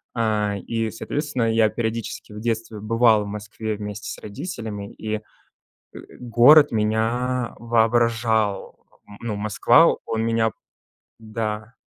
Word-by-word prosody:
э, 105 -3 0
и, 115 +2 -3
соответственно, 130 0 -2
я 110 -1 +3
периодически 110 -1 -4
в 105 - -8
детстве 115 -1 -3
бывал 110 0 +3
в - - -7
Москве 105 +1 -5
вместе 105 0 -6
с - - -8
родителями, 105 - -6
и, 110 0 -4
э, - - -13 1.0
город 125 +5 +6
меня 115 +3 0
воображал, 115 -2 +1 0.3
н 100 0 -13
ну, 115 -3 -3
Москва, 110 +10 +4
он 110 0 -2
меня 115 -1 +1 0.7
Да. 110 0 -4
110 Hz, 120 wpm, -23 LUFS, 105-115 Hz, 1.0 s, город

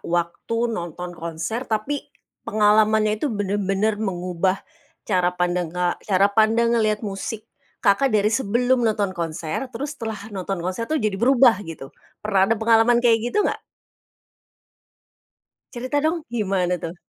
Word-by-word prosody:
waktu 200 +7 -2
nonton 175 -1 -5
konser 170 +9 -5
tapi 220 +7 -2 0.4
pengalamannya 215 0 +3
itu 300 - 0
benar-benar 205 0 -1
mengubah 185 -2 -1 0.5
cara 180 -3 +2
pandang 180 -1 0
ka 180 +1 -1
cara 200 0 +2
pandang 225 +2 +3
ngelihat 215 -2 +1
musik 205 +2 -5 0.4
Kakak, 205 +7 +4
dari 215 -1 +2
sebelum 245 +2 +1
nonton 205 -3 0
konser 165 +6 -4
terus 285 +3 -5
setelah 220 -4 -6
nonton 190 -2 -4
konser 185 +6 -3
tuh 315 - +1
jadi 215 -8 0
berubah 245 -4 +5
gitu, 165 -7 -9 0.3
pernah 195 -2 +3
ada 225 - +3
pengalaman 225 +2 +4
kayak 230 -1 +5
gitu 245 - 0
nggak? - - -1 2.1
Cerita 255 +4 -1
dong, 315 +2 -1
gimana 190 -6 0
tuh? 165 +1 -5
210 Hz, 135 wpm, -22 LUFS, 185-230 Hz, 2.1 s, berubah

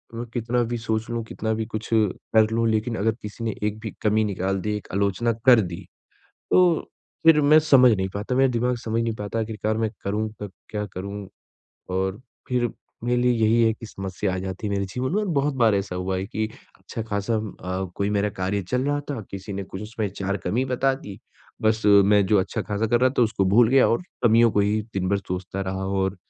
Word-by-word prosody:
मैं 120 - -4
कितना 120 0 0
भी 120 +1 -2
सोच 110 -1 -2
लूँ, 115 -1 -2
कितना 110 0 -3
भी 110 0 -2
कुछ 110 -1 -6
कर 110 +1 +2
लूँ, 115 0 +1
लेकिन 110 +1 0
अगर 110 +3 +2
किसी 105 +2 -7
ने 110 - -2
एक 105 0 -1
भी - - -6
कमी 110 +1 +3
निकाल 95 -1 -1
दी, 105 +2 -1
एक 105 - -11
आलोचना 100 +4 +1
कर 125 -3 +8
दी, 85 -3 -6 0.7
तो 180 -3 +4 0.4
फिर 160 -2 +7
मैं 150 +2 +6
समझ 135 -5 +6
नहीं 95 0 -1
पाता 105 +5 -2
मेरा 135 +1 +4
दिमाग 125 +1 0
समझ 115 +1 0
नहीं 115 - -1
पाता 105 +2 -4
आखिरकार 110 -1 -2
मैं 110 -1 0 0.2
करूँ 105 +2 -1
तो 105 - -4 0.2
क्या 105 -1 -3
करूँ? 100 +2 -6 0.6
और 95 +3 -1 0.3
फिर 120 -2 +1 0.3
मेरे 125 0 +1
लिए 125 0 +4
यही 115 0 +3
है 110 - +4
कि 115 - -10
समस्या 95 -1 -3
आ - - -2
जाती 95 +3 -5
है 100 - -2
मेरे 100 0 0
जीवन 130 +4 -2
में 210 - +2
और 210 - -3
बहुत 140 0 0
बार 115 -4 +3
ऐसा 100 -2 -2
हुआ 95 +1 -2
है 95 - -2
कि 110 +1 -2 0.3
अच्छा 115 - -6
खासा 100 +3 -1
अ, 95 -3 -4
कोई 100 +1 0
मेरा 105 0 +1
कार्य 95 +1 -2
चल 125 0 0
रहा 145 0 +1
था, 135 -6 -3
किसी 100 +1 -7
ने 100 0 -4
कुछ 95 +1 -8
उसमें 110 0 -3
चार 100 0 -2
कमी 120 +8 0
बता 130 +1 +1
दी, 105 -7 -9 0.4
बस 110 0 +2
मैं 100 0 +6
जो 105 +1 +4
अच्छा 95 - -3
खासा 105 +1 -1
कर 120 +1 +2
रहा 130 0 +4
था - - +6
उसको 110 -4 +1
भूल 110 +5 +5
गया 135 -1 +5
और 115 - +1 0.2
कमियों 115 0 +6
को 105 - +3
ही 105 +2 +1
दिन 95 -1 -1
भर 100 - +2
सोचता 95 0 -5
रहा 95 0 -3
और 95 0 -1
110 Hz, 225 wpm, -24 LUFS, 100-120 Hz, 0.7 s, कर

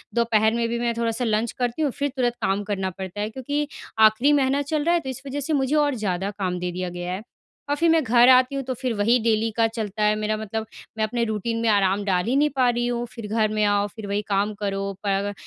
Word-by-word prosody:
दोपहर 220 -2 +3
में 235 0 0
भी 235 0 -2
मैं 235 -1 0
थोड़ा-सा 235 +1 -1
लंच 220 +1 0
करती 245 +4 -2
हूँ 290 -4 +1
फिर 285 +2 -2
तुरंत 245 -1 +1
काम 195 +2 0
करना 195 -2 -2
पड़ता 190 +2 -7
है, 210 - -2
क्योंकि 285 +5 -3 0.3
आखिरी 220 +6 +5
महीना 275 0 +2
चल 290 +1 -1
रहा 340 +2 +2
है - - +2
तो 265 - -6
इस 260 +1 -6
वज़ह 280 +2 -3
से 305 +3 -2
मुझे 275 +1 +1
और 290 -3 +2
ज़्यादा 195 -2 -2
काम 180 -2 -1
दे 180 0 -3
दिया 180 0 -4
गया 175 0 -5
है 190 - -4 0.5
और 290 - +2
फिर 330 +2 +2
मैं 325 -2 +4
घर 240 +1 +5
आती 255 +1 +5
हूँ 275 - -2
तो 260 0 -3
फिर 255 -3 -1
वही 225 +4 +3
डेली 225 0 +1
का 225 - +4
चलता 215 -2 -4
है 210 0 +3
मेरा 215 0 -1
मतलब 220 +1 -4 0.3
मैं 220 - 0
अपने 235 +2 0
रूटीन 220 +1 -2
में 230 - +2
आराम 200 -1 +2
डाल 180 -1 +1
ही 250 +4 0
नहीं 295 +1 +3
पा 255 -2 +3
रही 240 0 0
हूँ 240 0 -2
फिर 230 -3 -7
घर 215 0 +1
में 215 0 +1
आओ 205 0 +2
फिर 215 -2 -7
वही 200 +1 -1
काम 200 +2 +1
करो 195 0 -2
पर 200 - +1
अग 205 - -3
225 Hz, 265 wpm, -24 LUFS, 205-255 Hz, 0.5 s, आखिरी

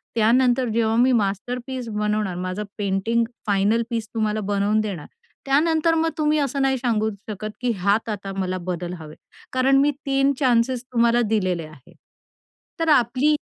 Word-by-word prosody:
त्यानंतर 245 +2 +3
जेव्हा 225 -1 +1
मी 255 +2 +4
मास्टरपीस 240 +4 -2
बनवणार 210 -3 -1
माझं 195 +3 -3
पेंटिंग 205 +4 0 0.2
फायनल 205 +3 +2
पीस 225 -2 -3
तुम्हाला 215 -1 -1
बनवून 205 +1 +1
देणार, 195 -8 -5 0.4
त्यानंतर 320 +4 +2
मग 325 0 +1
तुम्ही 305 0 +2
असं 275 0 -1
नाही 265 -1 +2
सांगू 220 -3 0 0.2
शकत 215 +1 -5
की 245 -1 +1
ह्यात 205 +4 +1
आता 195 -2 -5
मला 185 -1 -1
बदल 175 0 -3
हवेत. 155 -1 -11 0.4
कारण 265 +1 +3
मी 290 +1 +3 0.2
3 275 +1 +2
चान्सेस 250 -1 +2
तुम्हाला 235 0 +3
दिलेले 185 -6 0
आहेत." 150 -5 -17 0.8
तर 325 -1 +1
आपली 250 +5 0
230 Hz, 150 wpm, -23 LUFS, 200-260 Hz, 0.8 s, मी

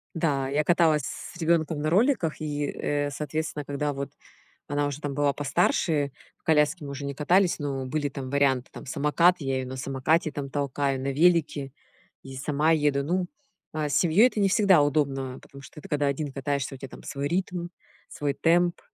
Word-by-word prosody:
Да, 140 -5 0
я 145 +2 +1
каталась 160 -3 +3
с - - -7
ребёнком 160 -2 +1
на 155 - -1
роликах, 195 - +2
и, 145 -1 -2
э, 145 0 -2
соответственно, 150 +1 -3
когда 145 +1 -2
вот 140 0 -4 0.6
она 145 0 0
уже 145 +1 -4
там 145 -2 -4
была 145 0 +2
постарше, 145 0 +1 0.3
в - - -44
коляске 150 +1 +2
мы 140 - -6
уже 140 +1 -6
не 140 - -4
катались, 175 +6 +2
но 135 -3 -3
были 145 +2 -1
там 135 -2 -6
варианты, 135 -3 +2
там, - - -10
самокат- 155 +6 +3
я 135 -1 -1
ее 130 - -5
на 130 +1 -6
самокате 140 +4 0
там 140 -1 -5
толкаю, 140 -1 -1
на 135 +1 -2
велике. 150 -3 +2 0.5
И 135 -1 -9
сама 150 +3 +1
еду. 145 -3 +2
Ну, 180 +5 0 0.5
а, 155 -1 -1
с 145 - 0
семьей 180 +8 +5
это 235 - -7
не 200 -1 +3
всегда 195 -5 +5
удобно, 135 -3 0
потому 140 0 -14
что 150 - -12
ты - - -12
когда 145 -1 0
один 140 +1 -2
катаешся 140 0 -2
у - - -16
тебя 135 - -8
там - - -12
свой 140 0 -4
ритм, 175 +1 -2 0.4
свой 145 -1 -2
темп, 175 +1 +2
145 Hz, 195 wpm, -26 LUFS, 140-160 Hz, 0.6 s, семьей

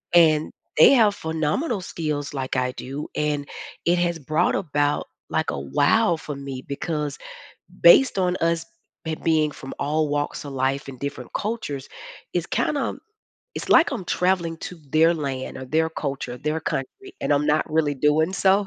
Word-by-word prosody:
And 155 -2 +5 0.3
they 155 - +9
have 220 -6 +5
phenomenal 160 - -1
skills 150 -5 -3
like 135 -2 -3
I 125 0 +1
do, 135 +3 -6
and 150 -1 -1 0.4
it 175 +1 +3
has 175 -1 +1
brought 155 +4 +1
about, 145 -5 0 0.2
like, - - 0
a, 70 - -4
"Wow," 145 - +3
for 150 -2 -6
me 135 -2 -6
because 150 0 -3 0.6
based 270 - +7
on 180 -1 +1
us 165 -1 0 0.4
ha 160 - -1
being 155 -2 +3
from 135 - -9
all 150 +1 0
walks 145 0 -2
of 140 - -7
life 135 +1 -1
and 130 -2 -9
different 140 0 -5
cultures, 200 - -3 0.5
is - - 0
kinda - - -1 0.6
it's - - -5
like 335 - +6
I'm 225 -9 -4
traveling 175 -2 0
to 180 - -7
their 165 +3 +5
land 135 -4 -4
or 130 - -6
their 160 +5 +1
culture, 140 -5 -4
their 155 +3 -2
country, 355 - -5
and - - +1
I'm 145 +1 +2
not 155 +1 +3
really 155 -2 +2
doing 150 +5 +2
so. 195 +1 +3
155 Hz, 165 wpm, -24 LUFS, 140-175 Hz, 0.6 s, they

